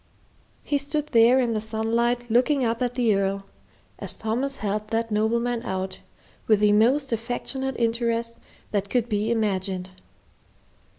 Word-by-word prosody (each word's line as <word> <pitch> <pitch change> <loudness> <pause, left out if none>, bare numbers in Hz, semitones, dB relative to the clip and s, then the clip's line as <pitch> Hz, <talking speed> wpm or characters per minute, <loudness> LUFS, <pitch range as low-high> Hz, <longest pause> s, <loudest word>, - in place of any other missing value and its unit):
He 285 - 0
stood 295 +1 -2
there 235 +1 +5
in 240 -3 +1
the 215 - -1
sunlight 230 +2 -1
looking 255 +3 +3
up 230 +1 -1
at 245 -1 -1
the 235 -4 +3
Earl, 195 0 -1 0.5
as - - -5
Thomas 250 +5 -2
helped 210 0 -3
that 230 0 -1
nobleman 235 +3 +1
out, 190 -4 -4 0.5
with 215 -2 +4
the 210 0 +5
most 250 +5 +3
affectionate 245 +3 -2
interest 230 0 -1 0.3
that 200 -1 -1
could 245 0 +1
be 210 -1 -1
imagined. 190 -4 -1
230 Hz, 140 wpm, -25 LUFS, 215-245 Hz, 0.5 s, there